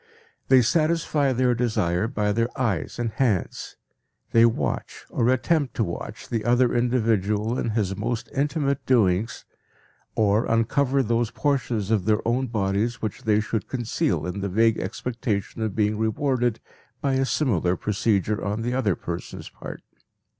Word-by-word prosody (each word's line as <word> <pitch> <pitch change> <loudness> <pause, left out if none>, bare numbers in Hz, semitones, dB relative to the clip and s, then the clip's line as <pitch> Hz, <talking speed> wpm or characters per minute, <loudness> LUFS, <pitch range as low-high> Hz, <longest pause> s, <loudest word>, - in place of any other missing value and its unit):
They 130 -2 +6
satisfy 155 0 +2
their 125 0 +2
desire 110 -5 0
by 105 -4 0
their 115 +3 +1
eyes 105 - -1
and 120 -2 -2
hands. 110 -7 -1 0.5
They 115 0 +6
watch 115 - -3
or 120 - +1
attempt 140 +2 +1
to 115 - +1
watch 85 -4 -6
the 115 -2 -2
other 120 +1 +3
individual 115 -2 +1
in - - -1
his 105 -3 -1
most 110 +3 -3
intimate 140 0 0
doings, 110 -3 +2 0.7
or 105 +1 +2
uncover 130 +4 +2
those 115 0 +1
portions 120 -7 -1
of 105 -5 +2
their 110 +1 +1
own 130 +3 +1
bodies 110 +2 -1
which 110 +4 -5
they 105 -1 +3
should 110 0 -2
conceal 120 -9 -1
in 90 +2 -4
the 100 - -2
vague 110 +3 +3
expectation 110 0 -3
of 110 -3 -2
being 105 -1 +1
rewarded 120 +1 0 0.4
by 140 -1 0
a 130 0 +2
similar 100 - +1
procedure 105 +1 0
on 105 +3 -2
the 120 +1 -1
other 110 -8 +1
person's 85 0 -6
part. - - -9
115 Hz, 150 wpm, -24 LUFS, 105-125 Hz, 0.7 s, They